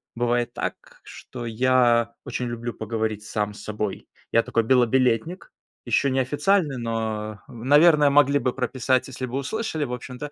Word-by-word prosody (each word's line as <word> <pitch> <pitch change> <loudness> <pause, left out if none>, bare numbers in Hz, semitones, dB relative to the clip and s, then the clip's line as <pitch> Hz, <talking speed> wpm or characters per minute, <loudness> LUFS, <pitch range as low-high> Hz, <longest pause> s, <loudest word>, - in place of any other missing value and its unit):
бывает 120 0 0
так, - - -6
что 120 -2 -9
я 120 0 +2
очень 125 - -3
люблю 120 0 -4
поговорить 110 -1 -3
сам 105 -1 -2
с - - -11
собой. 105 -2 -4 0.2
Я 115 - +4
такой 115 - 0
белобилетник 125 +6 +1 0.3
еще 140 - +2
неофициальный, 145 +4 +1
но, 110 -2 -3
наверное, 145 +5 +4
могли 145 0 +4
бы 125 - -1
прописать, 130 0 0
если 130 0 -5
бы 125 +2 -4
услышали, 160 - -3
в 125 - -5
общем-то. 125 +4 -7
125 Hz, 145 wpm, -24 LUFS, 115-135 Hz, 0.3 s, Я